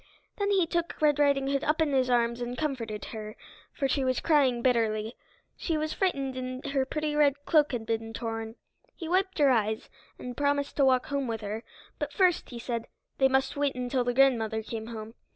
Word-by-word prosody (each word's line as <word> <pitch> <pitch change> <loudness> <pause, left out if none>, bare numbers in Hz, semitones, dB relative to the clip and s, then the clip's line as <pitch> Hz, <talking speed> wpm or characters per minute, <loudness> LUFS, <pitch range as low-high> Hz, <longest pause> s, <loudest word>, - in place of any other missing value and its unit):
Then 405 -1 0
he 385 -4 +3
took 340 +1 -2
Red 295 -2 +3
Riding 280 -2 +3
Hood 275 0 0
up 305 +2 +1
in 310 -3 +2
his 260 -1 +2
arms 235 0 +1
and 245 +1 -4
comforted 235 -9 -3
her, 215 -1 -6 0.4
for 275 - -1
she 270 +1 0
was 255 -1 +1
crying 265 -7 +3
bitterly. 225 -3 +1 0.4
She 325 -3 -1
was 310 0 -2
frightened 275 -9 -1
and 255 +2 -5
her 270 -2 +1
pretty 305 0 -2
red 285 -1 +2
cloak 300 -3 +4
had 235 -3 -3
been 225 0 -2
torn. 225 0 -4 0.4
He 330 - -7
wiped 375 +2 +1
her 285 -3 +5
eyes, 220 -2 0 0.3
and 250 -1 -7
promised 285 0 0
to 280 - +5
walk 255 -1 +3
home 280 -2 -1
with 225 -1 -3
her, 215 +2 -4 0.4
but - - -3
first, 365 -4 +2
he 240 - -7
said, 235 -1 -4 0.3
they 265 - +6
must 265 0 +1
wait 285 -1 0
until 250 0 -1
the 245 0 -1
grandmother 225 -5 +3
came 220 0 -6
home. 225 -1 -7
265 Hz, 205 wpm, -28 LUFS, 230-290 Hz, 0.4 s, they